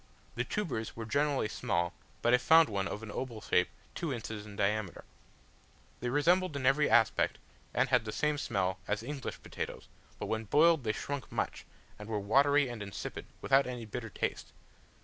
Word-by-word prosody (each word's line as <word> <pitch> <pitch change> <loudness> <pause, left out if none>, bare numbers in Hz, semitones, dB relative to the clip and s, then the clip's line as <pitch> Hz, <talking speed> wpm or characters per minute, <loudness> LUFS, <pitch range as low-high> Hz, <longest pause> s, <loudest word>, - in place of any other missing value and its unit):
The - - -1
tubers 150 - -3
were 115 - -5
generally 140 0 +1
small, 85 -6 -1 0.3
but 120 - +4
I 125 - +6
found 160 +3 +6
one, 100 -2 -1
of 105 - -5
an 110 - -6
oval 120 -2 -4
shape, 90 -4 +2 0.3
two 165 -4 -3
inches 110 -4 -5
in 100 - -10
diameter: 100 -1 -1 1.0
they 120 - -2
resembled 170 +5 +3
in 135 -2 -2
every 140 +3 +4
respect, 115 -3 +3 0.3
and - - +1
had - - +3
the 110 - -3
same 150 +4 0
smell 95 -8 -1
as 105 +1 -1
English 140 +1 -5
potatoes; - - -6 0.3
but - - -4
when 110 0 -2
boiled 155 +4 +4
they 110 - +2
shrunk 135 +7 -5
much, - - -2 0.3
and 105 +1 -8
were 110 - -1
watery 140 +7 +4
and 120 -3 -6
insipid, 100 -1 -6 0.2
without 135 0 +4
any 125 -2 -5
bitter 110 +2 -5
taste. - - -3
120 Hz, 180 wpm, -32 LUFS, 105-145 Hz, 1.0 s, I